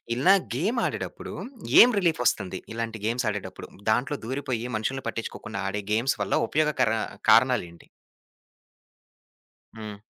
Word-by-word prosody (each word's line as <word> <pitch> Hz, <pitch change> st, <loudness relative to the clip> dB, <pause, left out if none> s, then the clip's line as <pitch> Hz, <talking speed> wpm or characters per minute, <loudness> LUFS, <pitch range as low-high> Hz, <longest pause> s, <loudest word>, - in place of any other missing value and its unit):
ఇలా 180 Hz, +11 st, +5 dB, 0.2 s
గేమ్ 200 Hz, -, 0 dB
ఆడేటప్పుడు -, -, -5 dB, 0.5 s
ఏం 245 Hz, -, +8 dB
రిలీఫ్ 165 Hz, -8 st, +1 dB
వస్తుంది? 95 Hz, -5 st, 0 dB
ఇలాంటి 115 Hz, -1 st, -4 dB
గేమ్స్ 120 Hz, +3 st, 0 dB
ఆడేటప్పుడు, 95 Hz, -3 st, -6 dB, 0.2 s
దాంట్లో 130 Hz, +6 st, 0 dB
దూరిపోయి 130 Hz, -3 st, -3 dB
మనుషుల్ని 130 Hz, +5 st, -3 dB
పట్టించుకోకుండా 110 Hz, -2 st, -5 dB
ఆడే 105 Hz, +1 st, -3 dB
గేమ్స్ 120 Hz, +5 st, +1 dB
వల్ల -, -, -3 dB
ఉపయోగకర 150 Hz, -6 st, +1 dB, 0.4 s
కారణాలేంటి? 110 Hz, -8 st, +2 dB, 1.9 s
హ్మ్. 105 Hz, -2 st, -8 dB
115 Hz, 110 wpm, -26 LUFS, 105-135 Hz, 1.9 s, ఏం